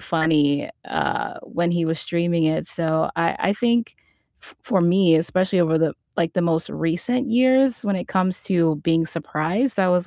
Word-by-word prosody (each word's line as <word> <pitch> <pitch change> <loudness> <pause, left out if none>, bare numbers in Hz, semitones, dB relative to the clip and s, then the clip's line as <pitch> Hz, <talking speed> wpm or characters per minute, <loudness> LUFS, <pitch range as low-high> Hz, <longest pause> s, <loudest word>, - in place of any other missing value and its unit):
funny, 155 -3 +1 0.2
uh, - - -3
when 170 0 -2
he 170 -1 0
was 160 -1 -2
streaming 170 -1 0
it, 155 0 0
so 160 -1 0
I 165 - 0
I 195 - +1
think 235 +1 0 0.5
f - - -14
for 190 - 0
me, 175 -1 +4
especially 185 +3 +1
over 160 -1 +2
the 160 -2 0 0.2
like, 165 -1 0
the 180 - +1
most 165 -1 0
recent 245 +11 0
years 260 0 +3
when 200 -2 0
it 180 - -5
comes 185 -1 0
to 165 -5 +1
being 165 -1 +2
surprised, 165 - -2
I 185 - +3
was 180 0 +1
170 Hz, 180 wpm, -21 LUFS, 160-195 Hz, 0.5 s, me